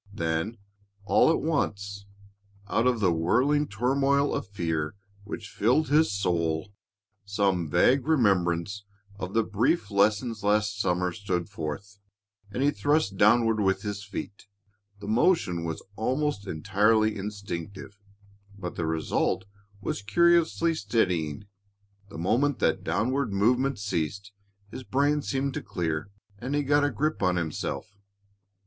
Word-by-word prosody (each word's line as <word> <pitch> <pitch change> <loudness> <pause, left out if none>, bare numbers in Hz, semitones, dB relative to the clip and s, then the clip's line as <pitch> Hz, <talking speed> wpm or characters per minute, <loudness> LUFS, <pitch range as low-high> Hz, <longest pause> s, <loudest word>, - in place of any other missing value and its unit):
Then 85 +3 -2 0.5
all 130 - +4
at - - 0
once, 100 -10 -2 0.6
out 115 +3 +1
of 125 -2 +2
the 90 -4 +3
whirling 130 - +2
turmoil 135 +6 +1
of - - -3
fear 80 -5 -2 0.3
which 105 +1 -6
filled 125 +9 +2
his 155 -2 +4
soul, 85 -2 -1 0.5
some 100 -5 0
vague 125 - +3
remembrance 100 - +1 0.4
of 95 +1 -5
the 115 - +4
brief 110 - 0
lessons 105 +3 +1
last 105 0 +1
summer 90 -1 0
stood 90 -3 -3
forth, 95 +3 -6 0.5
and 125 +6 -2
he 145 - +4
thrust 145 -10 +1
downward 110 +2 +4
with 95 0 +1
his 105 -1 -4
feet. 100 +1 -7 0.5
The 105 - -8
motion 110 - +2
was 80 -1 -4
almost 130 -2 -1
entirely 105 +6 +2
instinctive, 100 -1 -6 0.6
but 90 -3 -5
the 85 - -3
result 80 +3 0 0.4
was 100 - -3
curiously 170 +6 +3
steadying. 95 - -1 0.6
The 100 - -9
moment 120 - +1
that - - +1
downward 115 +8 0
movement 125 +6 +2
ceased, 100 0 -3 0.4
his - - -7
brain 145 +3 +1
seemed 135 0 -2
to - - -3
clear 80 +1 -3 0.3
and 135 +6 -3
he 145 - +1
got 145 +1 +3
a 145 - +3
grip 155 +5 -1
on 90 -1 +2
himself. 85 +4 -4
105 Hz, 130 wpm, -27 LUFS, 90-130 Hz, 0.6 s, all